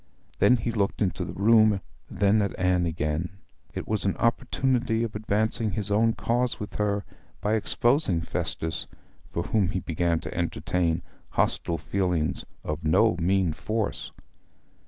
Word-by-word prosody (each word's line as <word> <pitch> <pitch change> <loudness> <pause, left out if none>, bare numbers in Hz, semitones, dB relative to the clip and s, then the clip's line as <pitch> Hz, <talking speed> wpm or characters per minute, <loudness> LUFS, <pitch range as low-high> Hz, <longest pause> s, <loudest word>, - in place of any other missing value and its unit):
Then 125 - +5
he 115 +1 -2
looked 100 -3 0
into 95 -4 0
the - - -6
room, 110 0 +5 0.3
then 100 +2 +3
at 100 - -2
Anne 90 -1 +2
again. 80 +3 -2 0.4
It - - -4
was 110 -1 -1
an 100 - 0
opportunity 125 -1 +1
of 115 -2 -4
advancing 110 +1 0
his 105 +1 -2
own 115 +2 +3
cause 120 +2 0
with 105 - -6
her 100 -1 0 0.3
by 105 - 0
exposing 110 - +2
Festus, 80 -1 -2 0.4
for 85 - -3
whom 100 0 +1
he 95 - -1
began 85 -1 0
to 80 - -6
entertain 85 0 -1 0.3
hostile 85 - 0
feelings 85 0 -1 0.2
of 75 +2 -4
no 85 +6 +4
mean 90 -1 +2
force. 110 +6 -3
100 Hz, 145 wpm, -26 LUFS, 85-110 Hz, 0.4 s, Then